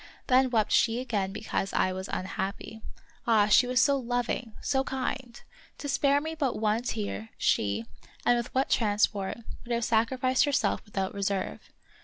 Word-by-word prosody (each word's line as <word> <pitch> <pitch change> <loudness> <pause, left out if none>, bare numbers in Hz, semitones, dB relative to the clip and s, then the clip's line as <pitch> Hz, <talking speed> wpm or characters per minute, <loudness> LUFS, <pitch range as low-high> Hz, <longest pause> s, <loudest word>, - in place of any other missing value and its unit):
Then 260 0 +4
wept 220 -4 +1
she 230 +1 +3
again 205 -7 -1
because 200 -1 -3
I 185 - +2
was 190 +1 -5
unhappy. 195 +4 -4 0.5
Ah, 220 -3 +5
she 215 +4 +5
was 250 0 +2
so 280 +3 +4
loving, 245 -2 -2
so 265 -1 0
kind! 260 -2 -4 0.4
To 285 - -6
spare 280 0 +3
me 315 +2 -4
but 285 -6 -1
one 215 +1 +1
tear, 105 - -4
she, 105 +2 +1 0.4
and 245 - +5
with 240 0 -3
what 265 +1 +2
transport, 205 -3 +1 0.3
would 240 - -8
have 235 -1 +1
sacrificed 255 +4 +2
herself 285 -2 +1
without 195 -3 -3
reserve. 200 -1 -3
230 Hz, 160 wpm, -28 LUFS, 200-260 Hz, 0.5 s, Ah